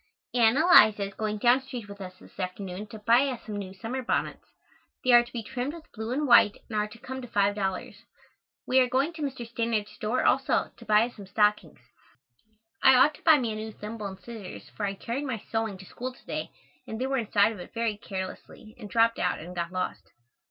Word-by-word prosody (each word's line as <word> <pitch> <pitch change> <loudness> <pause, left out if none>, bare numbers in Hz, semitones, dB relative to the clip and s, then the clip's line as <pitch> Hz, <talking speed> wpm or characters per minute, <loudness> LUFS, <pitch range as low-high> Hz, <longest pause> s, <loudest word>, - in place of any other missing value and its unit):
Ann 235 0 +4
Eliza 220 - +7
is 200 0 -5
going 215 0 -2
down 245 +4 +4
street 250 -5 -7
with 200 0 -10
us 185 -1 -8
this - - -18
afternoon 185 +2 -5
to 220 - -9
buy 235 +6 +4
us 255 -3 -5
some 210 -2 -5
new 195 -2 -5
summer 225 +7 -5
bonnets. 240 - -2 0.6
They 255 - +3
are 240 0 +9
to 240 - -14
be 235 -2 -5
trimmed 260 +7 -4
with 325 -2 -14
blue 220 +1 -5
and 290 +4 0
white 235 -5 +6
and 220 - -6
are 210 - 0
to 210 - -13
come 260 +2 -7
to 245 - -8
five 200 -2 +2
dollars. 190 -2 -3 0.7
We 260 - +4
are 255 -1 +3
going 275 +6 +1
to 320 - -9
Mr. 265 -5 -4
Stannard's 230 -2 -1
store 215 +3 -1
also, - - +2
to - - -14
buy 215 +1 +5
us 240 - -9
some 200 -2 -10
stockings. 210 - +1 1.0
I 265 - +7
ought 265 +4 +6
to - - -16
buy 320 -2 +7
me 240 -5 -1
a - - -4
new 220 +1 -5
thimble 210 0 -6
and 190 -1 -9
scissors 205 -2 -9
for 205 - -1
I 195 - -3
carried 245 +8 -4
my 255 -5 -2
sewing 225 -1 -3
to 190 - -12
school 255 +7 -6
to - - -21
day - - -4 0.4
and 220 - -5
they 255 - 0
were 270 0 0
inside 210 -1 +3
of 215 - -9
it 180 - -11
very 230 -2 0
carelessly 205 +3 -7
and 210 -3 -8
dropped 230 +2 +3
out - - +1
and 175 +3 -9
got 170 0 -3
lost. 185 0 -4
220 Hz, 230 wpm, -27 LUFS, 205-250 Hz, 1.0 s, are